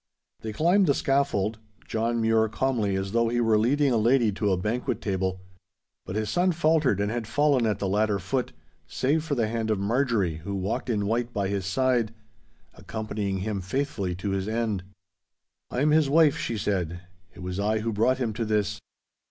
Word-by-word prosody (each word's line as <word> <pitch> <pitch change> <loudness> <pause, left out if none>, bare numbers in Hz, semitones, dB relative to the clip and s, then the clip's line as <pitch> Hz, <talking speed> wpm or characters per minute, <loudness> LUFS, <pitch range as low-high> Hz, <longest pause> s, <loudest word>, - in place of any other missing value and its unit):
They 110 - -5
climbed 175 - +3
the 140 - +3
scaffold—John 115 -3 -1
Mure 110 -1 +3
calmly 110 -4 0
as 95 0 -2
though 115 +1 +2
he 120 +1 0
were 115 -2 +3
leading 140 +5 +2
a 120 - +3
lady 115 0 +3
to 100 +1 0
a 95 - +2
banquet 110 +7 -2
table—but 95 -1 -6
his 110 0 -1
son 180 - +2
faltered 155 - +2
and 100 +1 0
had 120 -2 -3
fallen 145 -3 +2
at 105 -2 0
the 100 - -2
ladder 105 +1 +1
foot, 120 +4 -2 0.4
save 150 +4 0
for 155 -3 -2
the 115 -4 +1
hand 110 0 -2
of 110 - +2
Marjorie, 105 - 0
who 100 +5 -5
walked 100 +6 -2
in 105 -3 0
white 120 +3 -1
by 100 -4 -1
his 100 -2 -2
side, 120 0 +1 0.6
accompanying 105 -3 -4
him 100 -1 -2
faithfully 100 -3 -2
to 95 +3 -3
his 95 0 -2
end. 110 -4 -1 0.9
'I 125 - -2
am 150 +1 +3
his 155 -2 +4
wife,' 155 -1 +5
she 115 - -2
said. 90 -4 -2 0.3
'It 90 - -10
was 90 +1 -4
I 110 +2 +1
who 115 0 -2
brought 120 +5 +2
him 120 -4 -2
to 115 - -2
this. 105 -2 -1
110 Hz, 185 wpm, -26 LUFS, 100-125 Hz, 0.9 s, wife